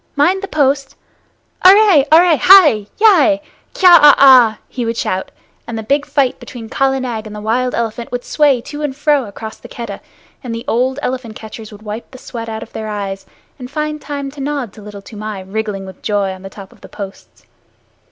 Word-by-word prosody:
Mind 350 Hz, +7 st, +2 dB
the 395 Hz, -, -5 dB
post! 275 Hz, -4 st, 0 dB, 0.7 s
Arre! 380 Hz, -6 st, +6 dB
Arre! 335 Hz, +1 st, +6 dB
Hai! 300 Hz, -, +6 dB
Yai! 350 Hz, -9 st, +4 dB, 0.4 s
Kya 375 Hz, -, +4 dB
a 295 Hz, -1 st, +7 dB
ah!" 250 Hz, -5 st, +6 dB
he 250 Hz, -, -5 dB
would 230 Hz, 0 st, -3 dB
shout, 185 Hz, 0 st, -2 dB, 0.4 s
and 230 Hz, -, -5 dB
the 220 Hz, -, -5 dB
big 280 Hz, +5 st, 0 dB
fight 270 Hz, -4 st, 0 dB
between 230 Hz, -3 st, -10 dB
Kala 270 Hz, +1 st, 0 dB
Nag 230 Hz, -4 st, -5 dB
and 210 Hz, -, -9 dB
the -, -, -7 dB
wild 245 Hz, +4 st, -1 dB
elephant 230 Hz, 0 st, -4 dB
would 245 Hz, 0 st, -4 dB
sway 285 Hz, -5 st, +2 dB
to 295 Hz, +4 st, -8 dB
and 290 Hz, -3 st, -3 dB
fro 290 Hz, -2 st, +1 dB
across 220 Hz, +1 st, -9 dB
the -, -, -13 dB
Keddah, 230 Hz, -5 st, -8 dB, 0.4 s
and 235 Hz, -3 st, -5 dB
the 230 Hz, +2 st, -7 dB
old 260 Hz, +1 st, 0 dB
elephant 250 Hz, -4 st, -4 dB
catchers 220 Hz, 0 st, -10 dB
would 210 Hz, 0 st, -14 dB
wipe 215 Hz, +2 st, -7 dB
the 260 Hz, -, -13 dB
sweat 230 Hz, -2 st, -8 dB
out 220 Hz, 0 st, -5 dB
of -, -, -16 dB
their 220 Hz, -, -5 dB
eyes, 200 Hz, -2 st, -5 dB, 0.3 s
and 250 Hz, -1 st, -8 dB
find 300 Hz, +1 st, -4 dB
time 280 Hz, -1 st, -5 dB
to 280 Hz, 0 st, -10 dB
nod 275 Hz, -7 st, -4 dB
to 215 Hz, -, -14 dB
Little 205 Hz, -1 st, -11 dB
Toomai 210 Hz, -1 st, -7 dB
wriggling 200 Hz, 0 st, -4 dB
with 190 Hz, -1 st, -12 dB
joy 205 Hz, -2 st, -1 dB
on 185 Hz, -, -12 dB
the 195 Hz, -, -9 dB
top 195 Hz, -1 st, -12 dB
of -, -, -22 dB
the -, -, -13 dB
posts. 195 Hz, -2 st, -10 dB
245 Hz, 205 wpm, -16 LUFS, 215-285 Hz, 0.7 s, a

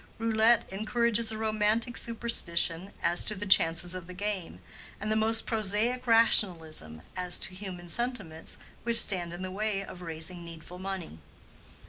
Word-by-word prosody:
Roulette 225 Hz, +1 st, +2 dB
encourages 230 Hz, +2 st, 0 dB
a 220 Hz, -, -6 dB
romantic 220 Hz, +2 st, -1 dB
superstition 195 Hz, -7 st, -2 dB
as 170 Hz, +1 st, +4 dB
to 215 Hz, -, 0 dB
the 205 Hz, +1 st, -6 dB
chances 170 Hz, -2 st, +5 dB
of 180 Hz, -2 st, -8 dB
the 185 Hz, -, -10 dB
game, 200 Hz, -3 st, -5 dB, 0.4 s
and 215 Hz, +1 st, -4 dB
the -, -, +1 dB
most 225 Hz, +1 st, +3 dB
prosaic 225 Hz, +3 st, -2 dB
rationalism 165 Hz, -, +2 dB
as 180 Hz, -1 st, -1 dB
to -, -, -3 dB
human 185 Hz, -2 st, -8 dB
sentiments 200 Hz, -6 st, -3 dB, 0.2 s
which 235 Hz, 0 st, +6 dB
stand 175 Hz, -6 st, +5 dB
in 175 Hz, +2 st, -8 dB
the 185 Hz, -, -6 dB
way 200 Hz, 0 st, -3 dB
of 180 Hz, -, -12 dB
raising 165 Hz, +1 st, -3 dB
needful 170 Hz, +1 st, -11 dB
money. 185 Hz, -, -7 dB
195 Hz, 150 wpm, -28 LUFS, 175-220 Hz, 0.4 s, which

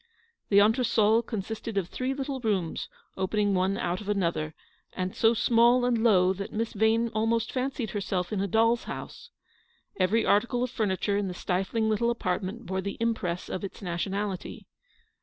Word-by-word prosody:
The 200 Hz, -, +4 dB
entresol 220 Hz, 0 st, +4 dB
consisted 220 Hz, 0 st, -5 dB
of 190 Hz, -3 st, 0 dB
three 255 Hz, +7 st, -3 dB
little 270 Hz, -1 st, -3 dB
rooms, 200 Hz, -8 st, -1 dB, 0.3 s
opening 200 Hz, +2 st, +1 dB
one 190 Hz, +1 st, +1 dB
out 175 Hz, +2 st, -2 dB
of 205 Hz, -, -7 dB
another, 170 Hz, -6 st, -1 dB, 0.4 s
and 185 Hz, 0 st, -3 dB
so 225 Hz, +1 st, +4 dB
small 240 Hz, +2 st, +4 dB
and 235 Hz, -2 st, +1 dB
low 190 Hz, -5 st, +5 dB
that 195 Hz, +1 st, -6 dB
Miss 225 Hz, +1 st, -2 dB
Yane 220 Hz, +2 st, +2 dB
almost 225 Hz, +1 st, 0 dB
fancied 255 Hz, -3 st, -2 dB
herself 195 Hz, -2 st, -2 dB
in 195 Hz, -, 0 dB
a 200 Hz, -, 0 dB
doll's 230 Hz, +4 st, +2 dB
house. 475 Hz, -, -8 dB, 0.7 s
Every 200 Hz, +5 st, +2 dB
article 240 Hz, +4 st, +2 dB
of 250 Hz, -, -2 dB
furniture 200 Hz, -2 st, 0 dB
in 205 Hz, -1 st, -1 dB
the 180 Hz, -, -5 dB
stifling 195 Hz, +6 st, -1 dB
little 220 Hz, +2 st, +1 dB
apartment 205 Hz, 0 st, -2 dB
bore 190 Hz, 0 st, -2 dB
the 200 Hz, +1 st, -5 dB
impress 220 Hz, -7 st, -1 dB
of 185 Hz, -, -4 dB
its 195 Hz, -, -6 dB
nation 175 Hz, +2 st, -2 dB
ality. 200 Hz, -2 st, -4 dB
210 Hz, 170 wpm, -28 LUFS, 190-230 Hz, 0.7 s, low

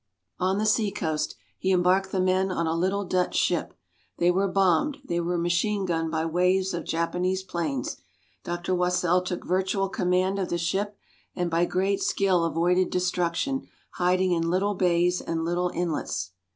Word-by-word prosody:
On 185 Hz, +1 st, +1 dB
the 215 Hz, -, 0 dB
sea 215 Hz, 0 st, +2 dB
coast, 160 Hz, -6 st, -2 dB, 0.2 s
he 190 Hz, -, 0 dB
embarked 185 Hz, +1 st, +3 dB
the 190 Hz, -, 0 dB
men 185 Hz, +1 st, +2 dB
on 170 Hz, -2 st, -1 dB
a 160 Hz, -, 0 dB
little 190 Hz, +4 st, 0 dB
Dutch 180 Hz, 0 st, 0 dB
ship. -, -, 0 dB, 0.4 s
They 175 Hz, +1 st, +3 dB
were 195 Hz, +2 st, +1 dB
bombed, 195 Hz, -, +2 dB
they 170 Hz, 0 st, -1 dB
were 175 Hz, +1 st, -1 dB
machine 175 Hz, +4 st, 0 dB
gunned 165 Hz, -2 st, -1 dB
by 160 Hz, 0 st, -1 dB
waves 180 Hz, +3 st, +1 dB
of 170 Hz, -1 st, -4 dB
Japanese 180 Hz, +3 st, -1 dB
planes. 155 Hz, -9 st, -3 dB, 0.5 s
Dr. 175 Hz, +1 st, -2 dB
Wassell 180 Hz, 0 st, +2 dB
took 180 Hz, -1 st, -4 dB
virtual 190 Hz, +2 st, 0 dB
command 185 Hz, +1 st, +1 dB
of 185 Hz, -, -2 dB
the 175 Hz, -, 0 dB
ship, 195 Hz, +5 st, -2 dB, 0.4 s
and 175 Hz, -2 st, -1 dB
by 170 Hz, +1 st, +3 dB
great 195 Hz, +3 st, 0 dB
skill 185 Hz, -4 st, +2 dB
avoided 175 Hz, +3 st, +2 dB
destruction, 180 Hz, +8 st, -1 dB, 0.3 s
hiding 185 Hz, +1 st, +2 dB
in 165 Hz, -1 st, +1 dB
little 195 Hz, +4 st, +1 dB
bays 180 Hz, -1 st, +2 dB
and 165 Hz, 0 st, -2 dB
little 175 Hz, +1 st, 0 dB
inlets. 150 Hz, -, -2 dB
180 Hz, 165 wpm, -26 LUFS, 170-190 Hz, 0.5 s, embarked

